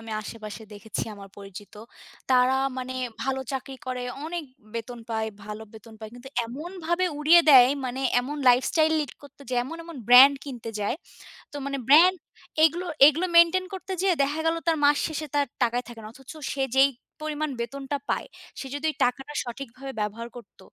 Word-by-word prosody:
আমি 225 0 -10
আশেপাশে 215 0 -8
দেখেছি, 210 0 -5
আমার 200 -1 -12
পরিচিত। 200 0 -11 0.6
তারা 255 0 +4 0.2
মানে 255 0 -5 0.3
ভালো 265 +1 -1
চাকরি 270 0 -5
করে, 255 -1 -3 0.2
অনেক 335 0 -4 0.3
বেতন 235 +1 -5
পায়, 220 0 -1 0.2
ভালো 210 +1 -7
বেতন 220 0 -13
পায়। 220 -1 -9
কিন্তু 245 +2 -11 0.2
এমনভাবে 345 +7 -3
উড়িয়ে 325 +3 +7
দেয়, 255 -3 +9 0.2
মানে 255 +1 -4 0.2
এমন 285 +4 -5
লাইফ 250 +1 +5
স্টাইল 315 -1 +3
লিড 290 -4 -4
করতো 280 0 -16
যে, 250 - -1
এমন, 325 +6 -7
এমন 335 -3 -10
ব্রান্ড 260 +3 +9
কিনতে 245 -5 -7
যায়। 205 +7 -1 0.6
তো - - -12
মানে 275 0 -3
ব্রান্ড 345 +6 +7 0.5
এগুলো, 345 +3 +3 0.2
এগুলো 320 +5 +2
মেনটেইন 340 +2 +5
করতে 380 0 -5
যেয়ে 380 -3 +2
দেখা 290 +3 -2
গেল, 325 - +2
তার 325 - +3
মাস 290 0 +5
শেষে 315 -1 -4
তার 285 -1 +3 0.2
টাকাই 240 +1 0
থাকে 235 -2 -10
না। 215 - -9
অথচ 270 +1 -13 0.2
সে 270 -1 -1
যেই 270 +1 +7 0.3
পরিমাণ 305 0 -2
বেতনটা 275 +4 -4
পায়। - - -1 0.3
সে 270 - -6
যদি 290 +2 -2 0.2
টাকাটা 270 +4 -1
সঠিকভাবে 260 +2 -8
ব্যবহার 210 +3 -3
করত, 235 -5 -13
270 Hz, 175 wpm, -25 LUFS, 235-310 Hz, 0.6 s, দেয়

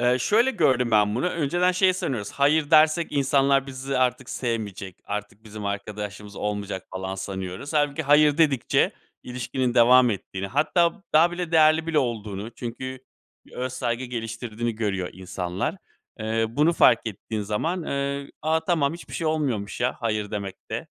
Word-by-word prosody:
Eee, 125 +1 +3
şöyle 230 - +3
gördüm 125 - +2
ben 105 -1 +3
bunu 155 +9 0
önceden 175 +3 +1
şey 185 0 +4
sanıyoruz, 130 - -3
hayır 145 +1 +2
dersek 155 +1 +4
insanlar 140 -1 +2
bizi 135 0 -3
artık 130 0 0
sevmeyecek, 105 -6 -4
artık 105 +1 -6
bizim 105 -1 -8
arkadaşlığımız 105 0 -5
olmayacak, 100 -2 -4
falan, 95 +1 -4
sanıyoruz. 95 - -5
Hâlbuki 145 0 +1
hayır 150 +1 +4
dedikçe 145 -7 +2 0.3
ilişkinin 125 0 -2
devam 125 +1 +6
ettiğini, 95 -1 -4
hatta, 170 - +1
daha 165 +3 +5
bile 175 -1 -4
değerli 160 0 +5
bile 160 -2 +1
olduğunu 110 -4 -3
çünkü 130 +2 -6 0.5
bir - - -20
öz 130 0 -4
saygı 125 0 -2
geliştirdiğini 115 -1 -4
görüyor 95 -5 -2
insanlar. 95 - -4 0.4
Eee, 110 +1 0
bunu 150 +8 +2
fark 115 -8 +4
ettiğin 110 +1 -4
zaman, 160 - -2
eee, 140 -1 -3
”A, 160 +1 +2
tamam! 160 -4 +1
Hiçbir 170 - -10
şey 165 - -2
olmuyormuş 130 -12 -1
ya, 125 +1 0
hayır 110 -3 -1
demekte.”, 100 -2 -5
125 Hz, 150 wpm, -25 LUFS, 105-150 Hz, 0.5 s, devam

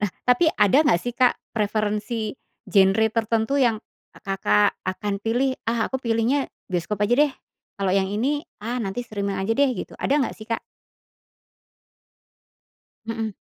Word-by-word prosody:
Nah, 205 -2 0
tapi 250 +7 +4
ada 210 +7 +4
enggak 175 -11 +3
sih, 245 - -3
Kak, 250 0 +4 0.2
preferensi 215 +1 -1 0.4
genre 195 +3 +4
tertentu 225 +3 0
yang 235 -4 +3 0.4
Kakak 145 - +1
akan 200 +2 -2
pilih? 255 +4 +1
Ah, 225 -1 0
aku 265 - -1
pilihnya 235 +4 +1 0.2
bioskop 185 +3 -2
aja 215 +4 +3
deh. 295 0 +4 0.5
Kalau 190 -2 +1
yang 190 -1 +1
ini, 285 +8 0 0.2
ah, 235 +4 -3
nanti 200 +1 -3
streaming 200 -3 -3
aja 195 +4 0
deh, 280 0 +4
gitu. - - -7
Ada 285 +2 +1
enggak 260 - -1
sih, 215 - -10
Kak? 230 0 -2 2.5
Mhm. 225 -1 -3
225 Hz, 145 wpm, -24 LUFS, 205-245 Hz, 2.5 s, tapi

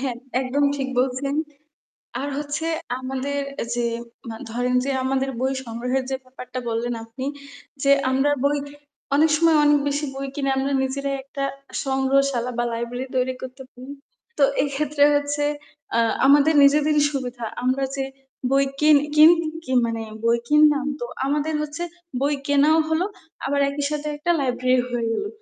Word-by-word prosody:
হ্যাঁ, 255 -3 -2 0.2
একদম 265 +2 0
ঠিক 270 -1 -2
বলছেন। 265 +2 -1 0.9
আর 280 - -3
হচ্ছে 295 +2 -3 0.3
আমাদের 265 +2 -3 0.4
যে 240 -1 0 0.4
মা 225 - -5
ধরেন 245 +2 -1
যে 275 - -1
আমাদের 270 0 0
বই 265 +1 +1
সংগ্রহের 250 +3 -2
যে 265 - 0
ব্যাপারটা 255 0 -8
বললেন 235 +1 -1
আপনি 230 +4 -7 0.6
যে, 275 - +3 0.2
আমরা 270 +2 +2
বই 285 +1 +3 0.6
অনেক 310 +2 +4
সময় 330 0 +4
অনেক 295 0 +5
বেশি 285 +1 -1
বই 275 +1 -4
কিনে 275 -1 -1
আমরা 270 +1 0
নিজেরাই 275 +1 -2
একটা 275 0 -4 0.4
সংগ্রহশালা 265 -2 +1
বা 240 - +2
লাইব্রেরি 235 +2 -4
তৈরি 255 0 +1
করতে 260 +1 -8
পাড়ি 255 +2 -11 0.5
তো 285 - +6 0.2
এক্ষেত্রে 285 +1 +1
হচ্ছে 290 0 0 0.5
আ - - +3 0.3
আমাদের 290 +3 +5
নিজেদেরই 300 +1 +4
সুবিধা 250 -3 -4 0.2
আমরা 260 +2 +1
যে 270 - -1 0.5
বই 275 +1 +4 0.2
কিন 300 0 +6 0.2
কিন 310 +2 +9 0.3
কি 260 - -4
মানে 230 -1 -3 0.2
বই 235 0 +3
কিনলাম 300 -2 +5
তো - - -2 0.2
আমাদের 295 +2 0
হচ্ছে 300 +3 -5 0.4
বই 285 +2 +2
কেনাও 290 +3 +4
হল 320 +1 +1 0.5
আবার 280 +1 +1
একই 285 0 -3
সাথে 300 0 -3
একটা 300 +4 -2
লাইব্রেরি 255 -1 +1
হয়ে 240 -1 -1
গেলো। 415 - -2
275 Hz, 155 wpm, -23 LUFS, 255-290 Hz, 0.9 s, কিন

